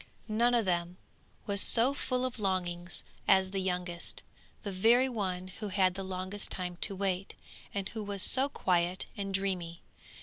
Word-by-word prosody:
None 235 Hz, +3 st, +3 dB
of 230 Hz, -3 st, +2 dB
them 175 Hz, 0 st, -1 dB, 0.5 s
was 200 Hz, -1 st, +1 dB
so 245 Hz, +4 st, +4 dB
full 255 Hz, -2 st, 0 dB
of 250 Hz, -2 st, -4 dB
longings 180 Hz, -3 st, -2 dB, 0.2 s
as 190 Hz, -1 st, +4 dB
the 195 Hz, -, -1 dB
youngest, 180 Hz, -2 st, -1 dB, 0.4 s
the 200 Hz, -, -3 dB
very 230 Hz, +7 st, +5 dB
one 185 Hz, -6 st, -2 dB
who 210 Hz, +3 st, -6 dB
had 190 Hz, -2 st, +3 dB
the 195 Hz, -, -5 dB
longest 190 Hz, +2 st, -4 dB
time 180 Hz, -1 st, -2 dB
to 195 Hz, +2 st, 0 dB
wait, 190 Hz, -1 st, -1 dB, 0.4 s
and 200 Hz, -1 st, -2 dB
who 220 Hz, -, -5 dB
was 200 Hz, -2 st, 0 dB
so 270 Hz, +2 st, +4 dB
quiet 180 Hz, -6 st, +1 dB
and 200 Hz, -1 st, -3 dB
dreamy. 185 Hz, -4 st, -2 dB
190 Hz, 165 wpm, -31 LUFS, 180-210 Hz, 0.5 s, very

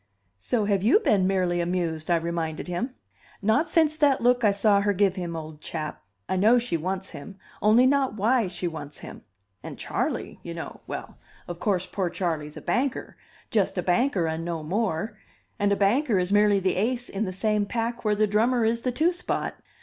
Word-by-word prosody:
"So 210 Hz, -, 0 dB
have 200 Hz, -2 st, +1 dB
you 230 Hz, -, +5 dB
been 200 Hz, -, +2 dB
merely 180 Hz, -2 st, +1 dB
amused," 170 Hz, -2 st, -2 dB
I 175 Hz, -, +4 dB
reminded 165 Hz, -1 st, -2 dB
him. 235 Hz, +9 st, -3 dB, 0.4 s
"Not 220 Hz, -, +2 dB
since 315 Hz, -3 st, +3 dB
that 290 Hz, -3 st, +3 dB
look 245 Hz, +1 st, +3 dB
I 210 Hz, -, +5 dB
saw 200 Hz, 0 st, +3 dB
her 205 Hz, 0 st, +1 dB
give 195 Hz, -1 st, +2 dB
him, 175 Hz, -3 st, -4 dB
old 155 Hz, -1 st, -8 dB
chap. 155 Hz, -2 st, -5 dB, 0.3 s
I 190 Hz, -, -1 dB
know 220 Hz, +6 st, +5 dB
she 240 Hz, -7 st, -1 dB
wants 185 Hz, +4 st, -3 dB
him, 195 Hz, +7 st, -10 dB, 0.2 s
only 220 Hz, +4 st, +5 dB
not 265 Hz, -4 st, +2 dB
why 225 Hz, +2 st, +2 dB
she 180 Hz, 0 st, -3 dB
wants 150 Hz, -3 st, -7 dB
him. -, -, -10 dB, 0.4 s
And -, -, -8 dB
Charley, -, -, -3 dB
you -, -, -7 dB
know -, -, -7 dB
well, -, -, -7 dB, 0.3 s
of 175 Hz, -1 st, -6 dB
course, 185 Hz, -3 st, 0 dB
poor 190 Hz, -3 st, -2 dB
Charley's 160 Hz, -4 st, -3 dB
a -, -, -7 dB
banker, 265 Hz, +1 st, -1 dB, 0.4 s
just 205 Hz, -3 st, +1 dB
a 180 Hz, -, 0 dB
banker 190 Hz, -1 st, +2 dB
and 160 Hz, +1 st, -2 dB
no 165 Hz, -2 st, -3 dB
more; 210 Hz, +3 st, -2 dB, 0.4 s
and 205 Hz, 0 st, +2 dB
a -, -, +4 dB
banker 215 Hz, +4 st, +2 dB
is 180 Hz, +1 st, 0 dB
merely 205 Hz, -1 st, +4 dB
the 190 Hz, -1 st, 0 dB
ace 240 Hz, +4 st, 0 dB
in 205 Hz, +3 st, -2 dB
the 185 Hz, -, -3 dB
same 210 Hz, +2 st, 0 dB
pack 235 Hz, +2 st, -2 dB
where 210 Hz, -1 st, +2 dB
the 215 Hz, +1 st, +3 dB
drummer 225 Hz, +3 st, +2 dB
is 230 Hz, +1 st, +1 dB
the 250 Hz, -, -1 dB
two 320 Hz, +8 st, +2 dB
spot. 355 Hz, -, -3 dB
200 Hz, 200 wpm, -26 LUFS, 175-230 Hz, 0.4 s, you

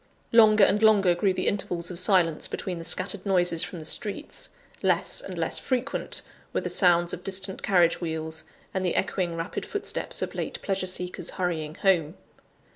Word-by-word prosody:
Longer 215 Hz, -2 st, +6 dB
and 205 Hz, +2 st, +4 dB
longer 205 Hz, -5 st, +5 dB
grew 190 Hz, +3 st, +1 dB
the 185 Hz, -, -2 dB
intervals 175 Hz, -3 st, -1 dB
of 175 Hz, -, +1 dB
silence 180 Hz, -5 st, +2 dB
between 180 Hz, -3 st, -5 dB
the -, -, -7 dB
scattered 185 Hz, +3 st, 0 dB
noises 175 Hz, -4 st, +2 dB
from 175 Hz, 0 st, -6 dB
the 155 Hz, -, -8 dB
streets; 205 Hz, +5 st, -4 dB, 0.3 s
less -, -, +1 dB
and -, -, -8 dB
less -, -, -2 dB
frequent 260 Hz, +2 st, -2 dB, 0.3 s
were -, -, 0 dB
the -, -, -3 dB
sounds 175 Hz, -2 st, +4 dB
of 180 Hz, -, -6 dB
distant 190 Hz, 0 st, +2 dB
carriage 175 Hz, -3 st, +3 dB
wheels, 160 Hz, -1 st, -4 dB, 0.3 s
and 190 Hz, -, -1 dB
the 180 Hz, -, 0 dB
echoing 180 Hz, -3 st, -1 dB
rapid 165 Hz, +3 st, -4 dB
footsteps 410 Hz, -, -3 dB
of -, -, -5 dB
late -, -, -4 dB
pleasure 195 Hz, -1 st, -1 dB
seekers 180 Hz, 0 st, -1 dB
hurrying 160 Hz, -4 st, -3 dB
home. 175 Hz, -4 st, +1 dB
180 Hz, 175 wpm, -26 LUFS, 170-195 Hz, 0.3 s, Longer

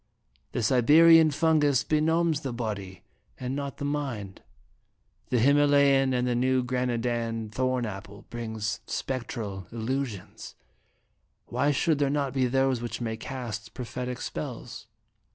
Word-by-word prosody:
The 120 Hz, -, -1 dB
Siberian 155 Hz, +7 st, +6 dB
fungus 150 Hz, -3 st, +2 dB
benumbs 160 Hz, 0 st, +2 dB
the 135 Hz, -, -4 dB
body, 105 Hz, -6 st, -5 dB, 0.4 s
and 125 Hz, +1 st, -3 dB
not 140 Hz, -1 st, -4 dB
the 140 Hz, -, -4 dB
mind; 130 Hz, -10 st, -4 dB, 0.9 s
the 125 Hz, -, +2 dB
Him 140 Hz, +5 st, +4 dB
alayan 140 Hz, -2 st, +4 dB
and 125 Hz, -1 st, +1 dB
the 125 Hz, -, +1 dB
New 130 Hz, +1 st, +2 dB
Granadan 120 Hz, -3 st, -2 dB
thorn 130 Hz, +1 st, 0 dB
apple 100 Hz, -1 st, -8 dB
brings 110 Hz, -2 st, -3 dB
spectral 110 Hz, -7 st, -4 dB
illusions; 115 Hz, -2 st, -4 dB, 0.9 s
why 130 Hz, +4 st, 0 dB
should 145 Hz, +1 st, +1 dB
there 140 Hz, -1 st, +2 dB
not 140 Hz, -2 st, -1 dB
be 130 Hz, -2 st, +2 dB
those 135 Hz, -1 st, +1 dB
which 120 Hz, -, -4 dB
may 115 Hz, -2 st, -2 dB
cast 115 Hz, -2 st, -6 dB
prophetic 125 Hz, 0 st, -5 dB
spells?" -, -, -6 dB
125 Hz, 130 wpm, -27 LUFS, 115-140 Hz, 0.9 s, Siberian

